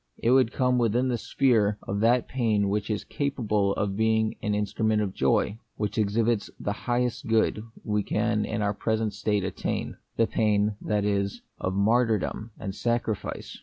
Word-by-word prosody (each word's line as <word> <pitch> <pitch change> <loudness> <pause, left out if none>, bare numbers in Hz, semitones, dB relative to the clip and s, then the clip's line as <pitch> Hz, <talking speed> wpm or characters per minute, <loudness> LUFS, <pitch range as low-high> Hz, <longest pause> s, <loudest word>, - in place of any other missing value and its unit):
It 115 - +1
would 130 -3 +4
come 125 -1 +2
within 120 +2 +2
the 120 - 0
sphere 110 -7 +2
of 100 +1 -1
that 120 +3 +3
pain 110 -6 +1
which 105 +1 -1
is 105 - -1
capable 105 -8 0
of 100 -1 -1
being 110 0 +2
the - - -4
instru 105 +1 -1
ment 110 -1 +3
of 100 -3 -1
joy; 100 +10 +1 0.2
which 105 +1 -2
exhibits 110 +1 +1
the 105 - -2
highest 120 +2 -1
good 110 -1 +2 0.2
we 105 -1 0
can 105 +1 0
in 105 -1 -2
our 100 0 +1
present 110 0 -1
state 105 -2 0
attain, 95 0 -3
— - - -41
the 115 - +4
pain, 105 -1 +1
that 105 -1 0
is, 100 -1 -1 0.2
of 95 +1 -2
martyrdom 110 +1 +1
and 100 -2 -4
sacrifice. 120 -1 -2
110 Hz, 175 wpm, -27 LUFS, 105-115 Hz, 0.2 s, would